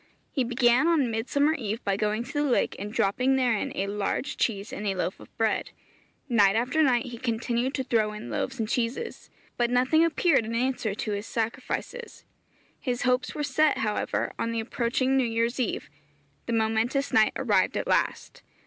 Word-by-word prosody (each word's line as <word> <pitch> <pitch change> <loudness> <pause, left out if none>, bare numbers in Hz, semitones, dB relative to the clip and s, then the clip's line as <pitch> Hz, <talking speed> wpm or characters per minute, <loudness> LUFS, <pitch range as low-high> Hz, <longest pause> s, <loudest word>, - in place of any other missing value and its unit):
He 270 - 0
began 245 +3 +3
on 295 -8 +2
Midsummer 280 +7 +1
eve 225 -7 -3
by 200 -1 +1
going 210 +2 -1
to 255 - -10
the 290 - +1
lake 270 -4 +1
and 205 +2 -5
dropping 250 +6 +2
therein 245 -5 +1
a 195 - -1
large 205 +8 -2
cheese 205 -2 -1
and 210 - -4
a 195 - 0
loaf 185 +1 -2
of - - -16
bread. 220 -1 0 0.6
Night 205 -6 +4
after 250 +7 +1
night 250 -5 +3
he 240 -2 -8
continued 240 +2 -1
to 265 - -1
throw 225 -4 +1
in 210 0 -8
loaves 265 - -2
and 220 -3 -1
cheeses, 245 - -3 0.3
but 240 -1 +2
nothing 255 +6 +3
appeared 330 -4 +3
in 225 +1 -4
answer 240 -4 -1
to 215 - -3
his 205 +1 -3
sacrifices. 250 - -4 0.5
His 245 -3 -2
hopes 250 0 +1
were 295 - -2
set, 295 +2 +2
however, 210 -1 -1
on 230 - -1
the 230 - -1
approaching 250 +3 0
New 260 -2 +2
Year's 230 +2 0
eve. 245 - -2 0.6
The 235 - -1
momentous 225 +5 0
night 215 -1 +4
arrived - - +1
at - - -2
last. - - -1
240 Hz, 185 wpm, -27 LUFS, 220-265 Hz, 0.6 s, Night